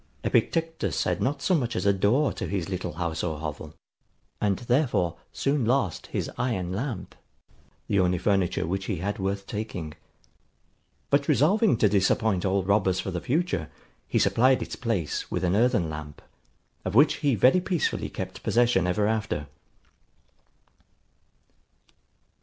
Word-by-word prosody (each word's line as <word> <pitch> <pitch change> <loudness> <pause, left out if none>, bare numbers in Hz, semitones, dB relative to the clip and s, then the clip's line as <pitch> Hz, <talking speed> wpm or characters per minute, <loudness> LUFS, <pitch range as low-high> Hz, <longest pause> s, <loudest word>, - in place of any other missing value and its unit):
Epictetus 165 0 0
had - - -1
not 140 +3 -1
so 185 - +2
much 125 -8 0
as - - -2
a 100 - +5
door 115 +10 +2
to 105 - -4
his 95 0 -3
little 95 -4 -3
house 80 -1 -3
or 80 -3 -2
hovel; 75 -1 -6 0.7
and 100 -2 +1
therefore, 120 - +1 0.2
soon 140 -1 0
lost 115 -6 0
his - - -3
iron 95 -8 -1
lamp, 110 -2 -4 0.7
the 100 - +2
only 90 -1 +2
furniture 95 -3 +1
which 95 +3 -2
he 100 - -2
had 100 +6 -3
worth 100 +1 -2
taking. 90 -8 -5 1.2
But 140 0 +3
resolving 160 - +3
to 110 - +4
disappoint 100 0 +2
all 95 0 +1
robbers 95 -1 +2
for 95 - -3
the 90 -1 -3
future, 140 - -1 0.4
he - - 0
supplied 130 +2 +3
its - - -7
place 110 -10 -2
with - - -2
an 90 +1 +2
earthen 115 -5 +2
lamp, 75 -1 -8 0.6
of 95 - -3
which 145 +6 +5
he 145 -4 +1
very 130 - +4
peacefully 175 -4 -1
kept - - -6
possession 120 -6 +2
ever 90 +4 +1
after. 110 -9 -1
100 Hz, 145 wpm, -26 LUFS, 90-125 Hz, 1.2 s, a